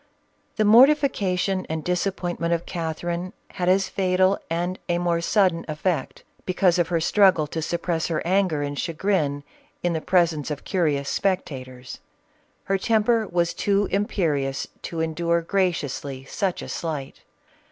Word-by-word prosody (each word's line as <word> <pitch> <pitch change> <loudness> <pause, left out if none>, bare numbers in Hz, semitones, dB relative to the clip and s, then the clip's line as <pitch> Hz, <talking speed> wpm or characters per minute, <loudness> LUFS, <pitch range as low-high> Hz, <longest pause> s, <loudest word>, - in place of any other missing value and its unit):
The 215 - +2
mortification 210 -7 +4
and 160 -1 -3
disappointment 175 -1 -1
of 170 - -6
Catherine, 170 +2 -4 0.2
had 180 -1 -1
as 195 +1 +3
fatal 185 0 +2
and 175 +3 -2
a 175 - +2
more 170 -1 0
sudden 180 -2 +2
effect, 160 +3 -2 0.2
because 180 -1 +2
of 170 - +2
her 170 -2 0
struggle 185 -2 +4
to 160 +2 -4
suppress 170 0 -1
her 165 -1 -2
anger 180 -5 +1
and 145 0 -4
chagrin 155 -5 -1 0.4
in 175 -1 +1
the 160 - -2
pres 175 -2 +3
ence 150 -1 -5
of 150 -2 -5
curious 150 -7 0
spectators. 130 -11 -3 0.6
Her 195 0 0
temper 220 +1 +2
was 170 -1 0
too 200 0 +1
im 200 +2 +1
perious 140 -7 -1 0.2
to 165 -1 -4
endure 170 +1 0
graciously 145 -8 -2
such 185 +6 -2
a - - -8
slight. 150 -5 -5
175 Hz, 145 wpm, -24 LUFS, 160-190 Hz, 0.6 s, mortification